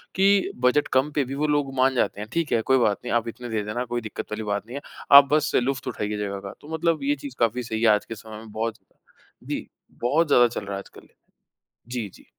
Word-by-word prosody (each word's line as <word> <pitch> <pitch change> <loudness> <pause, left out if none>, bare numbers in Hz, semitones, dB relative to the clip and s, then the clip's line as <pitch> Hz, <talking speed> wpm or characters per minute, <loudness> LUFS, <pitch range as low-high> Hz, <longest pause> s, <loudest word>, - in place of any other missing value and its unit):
कि 195 +1 +3
बजट 145 +4 +3
कम 135 +3 +3
पे 145 - +3
भी 135 +2 -5
वो 150 +2 0
लोग 145 -2 0
मान 130 0 +3
जाते 105 -3 0
हैं 105 - -7
ठीक 165 -2 -1
है 115 - +3
कोई 130 - +6
बात 105 -5 +2
नहीं 120 - -2
आप 120 0 +1
इतने 120 +1 -7
दे 110 -2 -1
देना 120 +4 -3
कोई 120 0 -3
दिक्कत 110 -1 -7
वाली 110 +1 -3
बात 105 0 -2
नहीं 125 - -8
है। - - -6 0.4
आप 140 -1 +8
बस 155 - +2
लुफ़्त 135 +1 -2
उठाइए 105 0 -3
जगह 100 -1 -3
का - - -9
तो 155 +2 -9
मतलब 160 -2 0
ये 145 +1 +2
चीज़ 130 -2 -7
काफ़ी 120 +2 +1
सही 110 -1 -3
है 115 - +4
आज 105 - -3
के 115 - -7
समय 110 0 -10
में 110 -1 -11
बहुत। 110 0 -2 0.7
जी - - -4 0.3
बहुत 150 +7 +2
ज़्यादा 120 -4 +6
चल 115 - -5
रहा 100 - -6
है 100 - -3
आजकल। - - -14 0.8
जी, 120 -4 -3
जी। - - -17
120 Hz, 250 wpm, -25 LUFS, 110-140 Hz, 0.8 s, आप